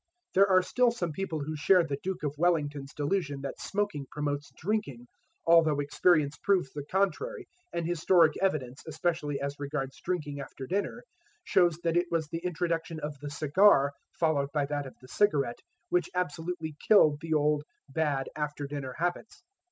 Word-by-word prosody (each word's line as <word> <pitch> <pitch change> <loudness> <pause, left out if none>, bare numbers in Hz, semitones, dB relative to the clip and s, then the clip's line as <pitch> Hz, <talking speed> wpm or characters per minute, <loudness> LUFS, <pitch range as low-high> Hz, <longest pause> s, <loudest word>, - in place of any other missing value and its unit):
There 195 +1 +6
are 185 -1 +5
still 250 +6 +3
some 180 -8 -2
people 165 -2 -3
who 155 +2 -4
share 175 +4 +4
the 140 -3 -3
Duke 190 -4 -4
of 145 -2 -1
Wellington's 145 -4 0
delusion 145 -2 -1
that 135 -1 -6
smoking 205 -9 -2
promotes 145 -1 -3
drinking, 160 - -2 0.4
although 165 -3 +5
experience 150 +1 +2
proves 185 -9 +1
the 145 - -5
contrary, 390 - -1 0.2
and 170 - -2
historic 170 -1 +4
evidence, 140 -9 -1
especially 160 -2 -1
as 140 +1 -4
regards 140 -2 -4
drinking 150 -6 -3
after 135 -1 -8
dinner, 200 - -2 0.4
shows 175 - +3
that 165 0 +1
it 175 0 +2
was 165 -2 0
the 165 +1 -5
introduction 165 -2 -2
of 150 -2 -5
the 145 +1 -6
cigar, 145 0 +4 0.3
followed 145 -4 +1
by 145 -1 +1
that 145 -1 -3
of 130 - -12
the 130 - -14
cigarette, 140 - +1 0.3
which 180 0 +1
absolutely 165 -2 -3
killed 155 -9 +6
the 160 -1 -1
old, 150 0 +2 0.2
bad 140 -1 -1
after 150 -1 -3
dinner 140 -2 -5
habits. 175 +6 -3
155 Hz, 165 wpm, -29 LUFS, 145-180 Hz, 0.4 s, There